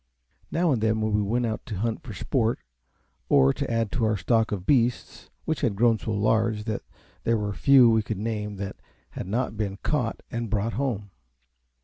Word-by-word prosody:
Now 170 Hz, -1 st, +1 dB
and 120 Hz, -5 st, +1 dB
then 110 Hz, 0 st, +2 dB
we 110 Hz, -1 st, +1 dB
went 120 Hz, +4 st, 0 dB
out 110 Hz, -1 st, -3 dB
to 110 Hz, -, -4 dB
hunt 115 Hz, +3 st, -2 dB
for 125 Hz, -, -9 dB
sport 115 Hz, +3 st, 0 dB, 0.7 s
or 65 Hz, +1 st, +5 dB
to -, -, -3 dB
add 115 Hz, -2 st, 0 dB
to 120 Hz, -4 st, 0 dB
our 110 Hz, -1 st, +1 dB
stock 110 Hz, +4 st, +1 dB
of 95 Hz, -3 st, -3 dB
beasts, 120 Hz, -2 st, 0 dB, 0.2 s
which 160 Hz, -, -1 dB
had 120 Hz, -7 st, +1 dB
grown 115 Hz, +1 st, +3 dB
so -, -, -6 dB
large 110 Hz, +1 st, +1 dB
that 110 Hz, -1 st, -3 dB, 0.4 s
there 115 Hz, 0 st, +2 dB
were 105 Hz, -1 st, -2 dB
few 135 Hz, +2 st, +6 dB
we 110 Hz, -1 st, +4 dB
could 105 Hz, -1 st, -4 dB
name 105 Hz, -1 st, -3 dB
that 100 Hz, 0 st, -6 dB, 0.3 s
had -, -, -6 dB
not 115 Hz, +3 st, -1 dB
been 100 Hz, -2 st, -2 dB
caught 125 Hz, -7 st, -1 dB
and 115 Hz, -1 st, -3 dB
brought 110 Hz, +2 st, 0 dB
home. 115 Hz, -7 st, -2 dB
110 Hz, 195 wpm, -26 LUFS, 105-120 Hz, 0.7 s, few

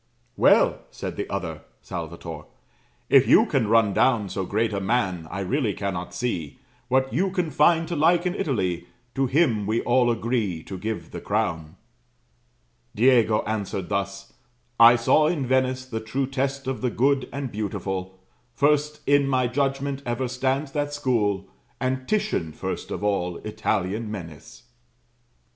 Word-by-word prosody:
"'Well,' -, -, +4 dB
said -, -, -6 dB
the -, -, -4 dB
other" -, -, -4 dB, 0.2 s
[Salvator], -, -, -7 dB, 0.6 s
'if -, -, +5 dB
you -, -, +6 dB
can 110 Hz, -, 0 dB
run 110 Hz, -2 st, +4 dB
down 110 Hz, -5 st, +2 dB
So 95 Hz, 0 st, -3 dB
great 110 Hz, +1 st, 0 dB
a 100 Hz, -, -1 dB
man, 95 Hz, -6 st, 0 dB
I 100 Hz, +2 st, -4 dB
really 110 Hz, +2 st, 0 dB
cannot 95 Hz, -3 st, -4 dB
see 90 Hz, -, -3 dB, 0.3 s
What 130 Hz, 0 st, +1 dB
you 185 Hz, +9 st, +1 dB
can 180 Hz, -4 st, -2 dB
find 160 Hz, +3 st, +3 dB
to 175 Hz, -, -3 dB
like 170 Hz, +3 st, +3 dB
in 180 Hz, -, 0 dB
Italy; 95 Hz, -, -2 dB, 0.3 s
To 135 Hz, 0 st, +1 dB
him 125 Hz, -8 st, +2 dB
we 110 Hz, +2 st, +1 dB
all 120 Hz, 0 st, +3 dB
agree 110 Hz, -7 st, -1 dB
to 95 Hz, -2 st, -7 dB
give 100 Hz, -5 st, -4 dB
the -, -, -7 dB
crown.' 80 Hz, -1 st, -2 dB, 1.2 s
"Diego 115 Hz, -2 st, +4 dB
answered 100 Hz, -4 st, -3 dB
thus: 100 Hz, 0 st, -3 dB, 0.5 s
'I 115 Hz, +1 st, +9 dB
saw 135 Hz, +6 st, +3 dB
in 155 Hz, -5 st, -1 dB
Venice 130 Hz, 0 st, +1 dB
The 110 Hz, -3 st, -4 dB
true 130 Hz, +5 st, -2 dB
test 135 Hz, +1 st, -2 dB
of 130 Hz, -1 st, -3 dB
the 125 Hz, -, +1 dB
good 135 Hz, +2 st, +1 dB
and 140 Hz, -3 st, -4 dB
beautiful; 95 Hz, -3 st, -4 dB, 0.4 s
First 150 Hz, +1 st, +1 dB
in 140 Hz, 0 st, +3 dB
my 130 Hz, -2 st, +2 dB
judgment, 135 Hz, +2 st, -1 dB
ever 120 Hz, +1 st, -2 dB
stands 130 Hz, +3 st, -1 dB
that 145 Hz, 0 st, -2 dB
school, 105 Hz, -9 st, 0 dB, 0.3 s
And 130 Hz, 0 st, -2 dB
Titian 210 Hz, -, -1 dB
first -, -, -5 dB
of -, -, -5 dB
all 90 Hz, -4 st, 0 dB
Italian 110 Hz, 0 st, -2 dB
men 90 Hz, -6 st, -6 dB
is.'" 115 Hz, -, -15 dB
120 Hz, 155 wpm, -24 LUFS, 100-135 Hz, 1.2 s, I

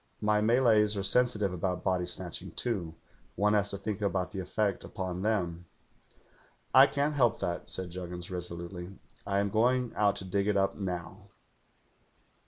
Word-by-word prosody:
'My 105 Hz, 0 st, +2 dB
Malays 110 Hz, -2 st, +4 dB
are 100 Hz, -, -1 dB
sensitive 105 Hz, -3 st, +2 dB
about 90 Hz, 0 st, -2 dB
body 90 Hz, -1 st, 0 dB
snatch 90 Hz, -1 st, -4 dB
ing, -, -, -8 dB
too. 90 Hz, -9 st, -2 dB, 0.4 s
One 105 Hz, +2 st, +2 dB
has 105 Hz, -1 st, +3 dB
to 100 Hz, -, -2 dB
think 105 Hz, +1 st, -4 dB
about 95 Hz, -3 st, -1 dB
the 95 Hz, -, -5 dB
effect 100 Hz, +2 st, -1 dB
upon 90 Hz, -1 st, -4 dB
them.' 90 Hz, -5 st, -1 dB, 1.1 s
'"I 135 Hz, +2 st, +9 dB
can't 145 Hz, +1 st, 0 dB
help 125 Hz, -6 st, +2 dB
that,' 90 Hz, -2 st, -3 dB
said 90 Hz, -2 st, -4 dB
Juggins 90 Hz, 0 st, -7 dB
resolutely. 90 Hz, +1 st, -6 dB, 0.3 s
*I 100 Hz, -1 st, 0 dB
am 100 Hz, 0 st, +1 dB
going 125 Hz, +3 st, +2 dB
out 105 Hz, -1 st, +3 dB
to 95 Hz, -, -4 dB
dig 100 Hz, +2 st, 0 dB
it 105 Hz, -1 st, +2 dB
up 95 Hz, 0 st, +2 dB
now.' 90 Hz, -4 st, -5 dB
100 Hz, 165 wpm, -30 LUFS, 90-105 Hz, 1.1 s, I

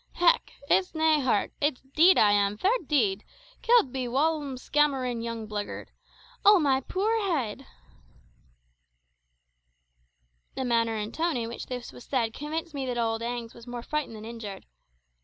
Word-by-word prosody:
"Hech! 355 Hz, +8 st, +3 dB
it's 365 Hz, +2 st, +2 dB
nae 315 Hz, -1 st, +3 dB
hurt 250 Hz, -7 st, 0 dB
it's 290 Hz, -3 st, 0 dB
deed 350 Hz, +4 st, +6 dB
I 210 Hz, -, +5 dB
am, 205 Hz, 0 st, +2 dB
fair 380 Hz, -, +2 dB, 0.2 s
deed; 210 Hz, -9 st, +1 dB, 0.4 s
killed 460 Hz, -, +4 dB
be 260 Hz, -1 st, -2 dB
a -, -, -4 dB
whaumlskamerin' 275 Hz, -3 st, 0 dB
young 230 Hz, -2 st, -5 dB
blagyird. 210 Hz, -1 st, -5 dB, 0.5 s
Oh, 410 Hz, 0 st, +8 dB
ma 270 Hz, -4 st, +2 dB
puir 425 Hz, +10 st, 0 dB
heed!" 270 Hz, -, -2 dB, 2.9 s
The 265 Hz, -, -2 dB
manner 230 Hz, -2 st, +1 dB
and 215 Hz, +1 st, -4 dB
tone 330 Hz, -3 st, 0 dB
in 230 Hz, -1 st, -3 dB
which 235 Hz, -, -7 dB
this 250 Hz, -1 st, -6 dB
was 245 Hz, -, -13 dB
said 235 Hz, -5 st, -1 dB
convinced 315 Hz, +4 st, -5 dB
me 275 Hz, -2 st, -3 dB
that 245 Hz, -1 st, -2 dB
old 225 Hz, -1 st, 0 dB
Agnes 235 Hz, -1 st, -4 dB
was 235 Hz, +1 st, -14 dB
more 240 Hz, -1 st, -6 dB
frightened 300 Hz, -5 st, -3 dB
than 215 Hz, 0 st, -9 dB
injured. 225 Hz, -4 st, -8 dB
255 Hz, 155 wpm, -27 LUFS, 230-305 Hz, 2.9 s, Oh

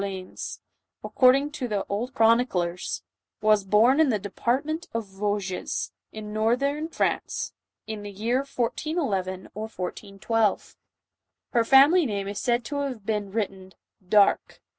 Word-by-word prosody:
leans'1 190 Hz, -2 st, -5 dB, 0.5 s
according 275 Hz, +3 st, +4 dB
to 290 Hz, -5 st, -4 dB
the 205 Hz, -3 st, -2 dB
old 225 Hz, +6 st, -2 dB
chroniclers, 225 Hz, -7 st, +1 dB, 0.4 s
was 215 Hz, -1 st, +3 dB
born 220 Hz, +8 st, +4 dB
in 315 Hz, -3 st, +5 dB
the 220 Hz, -, +2 dB
department 265 Hz, -, -2 dB
of 230 Hz, -1 st, -1 dB
Vosges, 195 Hz, -1 st, -3 dB, 0.2 s
in 210 Hz, -1 st, -7 dB
northern 275 Hz, +8 st, +1 dB
France, -, -, -1 dB, 0.3 s
in 220 Hz, -1 st, -5 dB
the 205 Hz, -, -7 dB
year 220 Hz, +5 st, -1 dB
1411 240 Hz, -, -2 dB
or 215 Hz, +2 st, -5 dB
1412. 205 Hz, +2 st, -2 dB, 0.8 s
Her 235 Hz, -, +4 dB
family 280 Hz, +7 st, +6 dB
name 200 Hz, -3 st, -3 dB
is 200 Hz, 0 st, -4 dB
said 240 Hz, -1 st, 0 dB
to 285 Hz, -, -4 dB
have 265 Hz, -7 st, -3 dB
been 210 Hz, -2 st, -2 dB
written 190 Hz, -3 st, -4 dB, 0.4 s
Dare. 205 Hz, -1 st, +5 dB
220 Hz, 130 wpm, -26 LUFS, 200-255 Hz, 0.8 s, family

